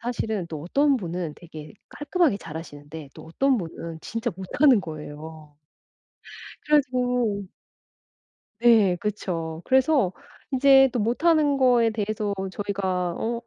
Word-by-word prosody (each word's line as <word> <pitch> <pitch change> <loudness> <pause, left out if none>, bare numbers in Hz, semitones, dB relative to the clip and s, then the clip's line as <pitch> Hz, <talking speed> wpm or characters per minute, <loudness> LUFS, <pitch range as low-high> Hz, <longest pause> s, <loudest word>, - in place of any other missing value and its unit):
사실은 220 -6 -3
또 155 -3 -7
어떤 280 - +2
분은 175 -5 -4
되게 155 -3 -11 0.2
깔끔하게 295 - 0
잘하시는데 155 -3 -9
또 155 - -12
어떤 265 +9 +1
분은 165 -1 -7
진짜 230 +6 -3
못하는 235 +5 +3
거예요. 155 -2 -9 1.1
그래서 300 -2 +3 1.7
네 225 -6 +5
그쵸. 170 -6 -4
그래서 265 - +3 0.4
이제 270 0 +6
또 245 - -1
못하는 290 +6 +2
거에 245 -3 +4
대해서 215 -1 -2 0.2
저희가 190 -3 -2
어 235 +1 -2
205 Hz, 250 characters per minute, -24 LUFS, 165-255 Hz, 1.7 s, 이제